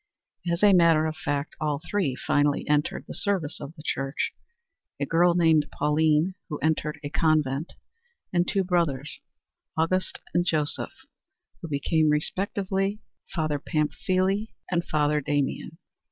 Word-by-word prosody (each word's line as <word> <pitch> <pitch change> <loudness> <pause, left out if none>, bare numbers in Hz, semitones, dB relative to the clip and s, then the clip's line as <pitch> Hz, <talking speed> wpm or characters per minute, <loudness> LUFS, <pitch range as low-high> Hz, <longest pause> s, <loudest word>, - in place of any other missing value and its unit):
As 170 +3 -1
a 205 -1 +7
matter 165 -3 +5
of 155 0 -2
fact 145 -1 -3
all 150 -2 0
three 185 -11 0
finally 145 +2 +1
entered 150 0 0
the - - -6
service 185 -7 -1
of 150 +4 -8
the 150 - -12
Church 135 -2 -2 0.7
a - - 0
girl 170 +1 +3
named 160 -3 +4
Pauline 155 +4 +2 0.2
who 150 - -3
entered 150 -1 -1
a 145 - -3
convent 155 -2 +1 0.6
and 175 0 +2
two 195 - +1
brothers, 165 -7 0 0.6
Auguste 185 +4 0
and 175 - +3
Joseph, 155 -4 0 0.6
who - - -5
became 155 +2 +1
respectively 195 +5 -1 0.4
Father 155 -3 0
Pamphile 185 +7 0 0.2
and 175 -1 +1
Father 150 0 +1
Damien. 145 -1 -2
155 Hz, 135 wpm, -26 LUFS, 150-175 Hz, 0.7 s, a